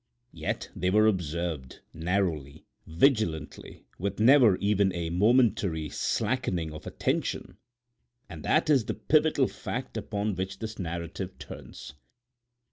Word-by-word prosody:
Yet -, -, -4 dB
they 90 Hz, -, 0 dB
were 105 Hz, +3 st, +4 dB
observed, 85 Hz, -8 st, -2 dB
narrowly, 80 Hz, -5 st, -2 dB, 0.2 s
vigilantly, 85 Hz, -, 0 dB
with 100 Hz, +2 st, -3 dB
never 120 Hz, -4 st, +6 dB
even 100 Hz, -1 st, +2 dB
a 85 Hz, -1 st, -3 dB
momentary 100 Hz, -, +2 dB
slackening 100 Hz, -9 st, -1 dB
of 75 Hz, -, -9 dB
attention; -, -, -2 dB, 0.7 s
and 85 Hz, -5 st, -9 dB
that 155 Hz, -, +2 dB
is 140 Hz, -7 st, +4 dB
the -, -, -3 dB
pivotal 155 Hz, -3 st, +3 dB
fact 130 Hz, +1 st, -5 dB
upon 105 Hz, 0 st, -2 dB
which 95 Hz, +1 st, -4 dB
this 110 Hz, +1 st, -6 dB
narrative 85 Hz, +1 st, -5 dB
turns. -, -, -10 dB
95 Hz, 120 wpm, -28 LUFS, 85-110 Hz, 0.7 s, never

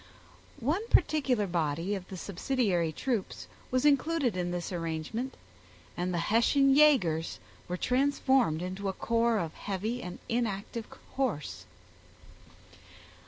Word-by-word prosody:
One 300 Hz, -, +1 dB
particular 265 Hz, -, +2 dB
body 170 Hz, +1 st, -1 dB
of 190 Hz, -2 st, -5 dB
the 190 Hz, -, -7 dB
subsidiary 185 Hz, -3 st, 0 dB
troops 230 Hz, +2 st, -3 dB, 0.2 s
was 255 Hz, +2 st, +1 dB
included 290 Hz, -, +3 dB
in 180 Hz, -1 st, -1 dB
this 175 Hz, +1 st, -3 dB
arrange 165 Hz, -1 st, -3 dB
ment, 255 Hz, +4 st, -3 dB, 0.6 s
and 180 Hz, +1 st, -1 dB
the 175 Hz, -, -1 dB, 0.2 s
Hessian 275 Hz, +4 st, +4 dB
yagers 205 Hz, -, +4 dB, 0.3 s
were 180 Hz, -, -3 dB
transformed 260 Hz, -, +2 dB
into 190 Hz, +2 st, -3 dB
a -, -, -2 dB
corps 230 Hz, +2 st, +1 dB
of 165 Hz, -4 st, -2 dB
heavy 215 Hz, +5 st, -3 dB
and 180 Hz, -4 st, -6 dB
inactive 230 Hz, -1 st, -2 dB, 0.2 s
horse. 245 Hz, -, -2 dB
210 Hz, 120 wpm, -30 LUFS, 175-260 Hz, 0.6 s, Hessian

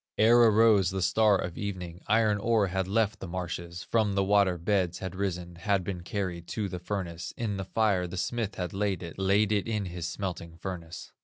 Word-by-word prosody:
"Ere 115 Hz, +2 st, +6 dB
arose 110 Hz, -4 st, +5 dB
the 95 Hz, -, -3 dB
star 105 Hz, +3 st, +4 dB
of 90 Hz, -2 st, -5 dB
evening, 90 Hz, -3 st, -5 dB
Iron 110 Hz, -1 st, +3 dB
ore 110 Hz, -2 st, +2 dB
had 95 Hz, 0 st, -1 dB
left 110 Hz, +1 st, +1 dB
the -, -, -6 dB
marshes, 85 Hz, 0 st, -5 dB
From 110 Hz, -4 st, +1 dB
the 100 Hz, -, +2 dB
water 100 Hz, -2 st, +3 dB
beds 90 Hz, 0 st, 0 dB
had 95 Hz, -2 st, -5 dB
risen, 90 Hz, -3 st, -3 dB
Had 95 Hz, +2 st, +1 dB
been 90 Hz, -1 st, -4 dB
carried 90 Hz, -2 st, -4 dB
to 105 Hz, -2 st, 0 dB
the 90 Hz, -1 st, -5 dB
furnace, 90 Hz, -3 st, -5 dB
In 105 Hz, -4 st, -2 dB
the 95 Hz, -, -4 dB
fire 100 Hz, -3 st, +1 dB
the 90 Hz, +2 st, -7 dB
smith 110 Hz, +1 st, -2 dB
had 90 Hz, -2 st, -4 dB
laid 100 Hz, -1 st, -1 dB
it, 85 Hz, +2 st, -8 dB
Laid 100 Hz, +2 st, +3 dB
it 105 Hz, 0 st, +1 dB
in 105 Hz, -3 st, -1 dB
his 85 Hz, -2 st, -4 dB
smelting 90 Hz, -3 st, -5 dB
furnace. 85 Hz, -2 st, -7 dB
95 Hz, 205 wpm, -29 LUFS, 90-105 Hz, -, Ere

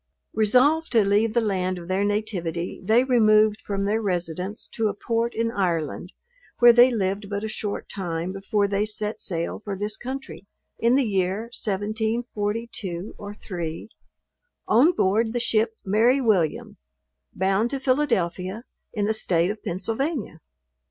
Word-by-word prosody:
Resolved 260 Hz, +9 st, +3 dB
to 225 Hz, -3 st, +5 dB
leave 210 Hz, +3 st, +2 dB
the 235 Hz, -, +4 dB
land 185 Hz, -4 st, -1 dB
of 170 Hz, -1 st, -9 dB
their 190 Hz, +2 st, 0 dB
nativity 185 Hz, -5 st, -2 dB
they 225 Hz, +6 st, +4 dB
removed 215 Hz, -4 st, +4 dB
from 195 Hz, -1 st, -2 dB
their 215 Hz, +2 st, +1 dB
residence 180 Hz, 0 st, -3 dB
to 225 Hz, -1 st, -1 dB
a 205 Hz, -, -2 dB
port 230 Hz, +3 st, -1 dB
in 230 Hz, 0 st, 0 dB
Ireland, 175 Hz, -4 st, -2 dB, 0.5 s
where 240 Hz, 0 st, +8 dB
they 245 Hz, +2 st, +7 dB
lived 200 Hz, -3 st, -2 dB
but 200 Hz, 0 st, -3 dB
a -, -, -2 dB
short 210 Hz, -1 st, -4 dB
time 175 Hz, -2 st, -3 dB
before 200 Hz, +1 st, 0 dB
they 200 Hz, +1 st, 0 dB
set 215 Hz, 0 st, -3 dB
sail 170 Hz, +1 st, -3 dB
for 200 Hz, -2 st, -4 dB
this 210 Hz, +2 st, -3 dB
country, 260 Hz, -5 st, -7 dB, 0.3 s
in 235 Hz, +2 st, +3 dB
the 275 Hz, -1 st, +3 dB
year 195 Hz, +2 st, -1 dB
1742 215 Hz, -2 st, -3 dB
or 205 Hz, 0 st, -7 dB
3 170 Hz, -2 st, -6 dB, 0.8 s
on 255 Hz, +10 st, +5 dB
board 220 Hz, -, +1 dB
the 240 Hz, -, 0 dB
ship 225 Hz, -1 st, +1 dB
Mary 225 Hz, +7 st, +3 dB
William, 200 Hz, -, 0 dB, 0.6 s
bound 195 Hz, +5 st, +1 dB
to 275 Hz, -, -3 dB
Philadelphia, 220 Hz, -7 st, 0 dB, 0.3 s
in 205 Hz, -2 st, 0 dB
the 220 Hz, -, +1 dB
state 180 Hz, -4 st, +1 dB
of 215 Hz, -, -9 dB
Pennsylvania. 220 Hz, -, -3 dB
210 Hz, 150 wpm, -24 LUFS, 190-230 Hz, 0.8 s, where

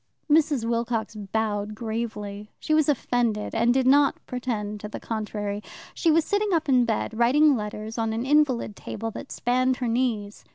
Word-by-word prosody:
Mrs. 295 Hz, -5 st, +3 dB
Wilcox 230 Hz, -1 st, -1 dB
bowed 210 Hz, 0 st, -2 dB
gravely. 210 Hz, -2 st, -5 dB
She 310 Hz, -, -1 dB
was 310 Hz, -1 st, +3 dB
offended, 240 Hz, -5 st, 0 dB
and 235 Hz, +1 st, +3 dB
did 260 Hz, +1 st, +2 dB
not 280 Hz, +2 st, +5 dB
pretend 220 Hz, -5 st, -3 dB
to 210 Hz, -, -6 dB
the -, -, -6 dB
contrary. 210 Hz, -2 st, -4 dB, 0.3 s
She 335 Hz, -, +1 dB
was 320 Hz, 0 st, +4 dB
sitting 410 Hz, 0 st, 0 dB
up 325 Hz, -2 st, +1 dB
in 255 Hz, -3 st, +4 dB
bed, 225 Hz, -1 st, -1 dB
writing 275 Hz, +6 st, +4 dB
letters 215 Hz, +1 st, -5 dB
on 225 Hz, -1 st, 0 dB
an 225 Hz, +3 st, -2 dB
invalid 265 Hz, -7 st, +2 dB
table 225 Hz, +3 st, -5 dB
that -, -, -9 dB
spanned 255 Hz, +2 st, +1 dB
her 250 Hz, -, -2 dB
knees. 230 Hz, -4 st, -1 dB
235 Hz, 170 wpm, -25 LUFS, 215-265 Hz, 0.3 s, not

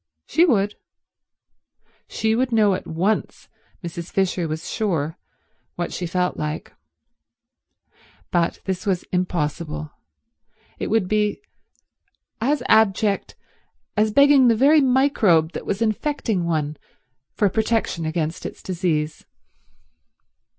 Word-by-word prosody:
She 330 Hz, +4 st, +3 dB
would. 205 Hz, -, +2 dB, 1.3 s
She 220 Hz, 0 st, 0 dB
would 250 Hz, +2 st, 0 dB
know 215 Hz, -3 st, +4 dB
at 185 Hz, -, -4 dB
once, 185 Hz, +7 st, -1 dB, 0.4 s
Mrs. 170 Hz, 0 st, -6 dB
Fisher 185 Hz, -3 st, 0 dB
was 155 Hz, +1 st, -5 dB
sure, 165 Hz, -8 st, -1 dB, 0.6 s
what 175 Hz, 0 st, -3 dB
she 180 Hz, -, -3 dB
felt 180 Hz, +1 st, -1 dB
like. 150 Hz, 0 st, -4 dB, 1.6 s
But 170 Hz, -1 st, 0 dB
this 190 Hz, +2 st, -3 dB
was 185 Hz, -3 st, 0 dB
impossible. 155 Hz, -3 st, -2 dB, 0.9 s
It -, -, -2 dB
would 220 Hz, -3 st, +2 dB
be 210 Hz, +1 st, 0 dB, 1.0 s
as 280 Hz, +5 st, +1 dB
abject 205 Hz, -1 st, +2 dB, 0.6 s
as 215 Hz, 0 st, +3 dB
begging 280 Hz, +1 st, +6 dB
the 230 Hz, -, +5 dB
very 290 Hz, +6 st, +5 dB
microbe 250 Hz, -, +3 dB
that -, -, -7 dB
was 205 Hz, +3 st, 0 dB
infecting 220 Hz, -, -1 dB
one 155 Hz, -2 st, -1 dB, 0.6 s
for 210 Hz, -, +3 dB
protection 220 Hz, -4 st, 0 dB
against 160 Hz, 0 st, -2 dB
its -, -, -8 dB
disease. 165 Hz, -4 st, -2 dB
190 Hz, 110 wpm, -22 LUFS, 170-220 Hz, 1.6 s, begging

